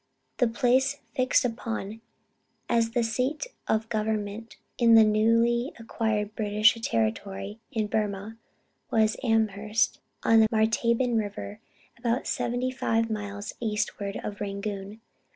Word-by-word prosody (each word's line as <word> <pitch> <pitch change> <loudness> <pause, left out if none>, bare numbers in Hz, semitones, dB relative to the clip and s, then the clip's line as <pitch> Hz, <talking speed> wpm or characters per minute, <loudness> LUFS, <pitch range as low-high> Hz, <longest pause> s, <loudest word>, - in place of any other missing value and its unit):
The 245 - +3
place 260 +4 +2 0.2
fixed 255 -1 +3
upon 225 -2 -4 0.7
as 230 -1 +2
the 240 - +2
seat 255 - -1 0.2
of 220 +1 +1
government 215 0 -3 0.2
in 230 -2 +6
the 225 - +9
newly 230 +3 +2
acquired 220 -2 -2
British 215 +1 +4
territory 195 - -2
in 220 -5 0
Burmah, 205 0 -2 0.5
was 220 -1 +3
Amherst, 220 -1 +1 0.2
on 225 0 +5
the 220 - +6
Martaban 230 +2 +2
river, 205 0 -5 0.4
about 240 +1 0
75 245 -2 -1
miles 205 0 -5
eastward 210 -2 -2
of 205 0 -6
Rangoon. 200 +1 -5
220 Hz, 115 wpm, -27 LUFS, 210-235 Hz, 0.7 s, the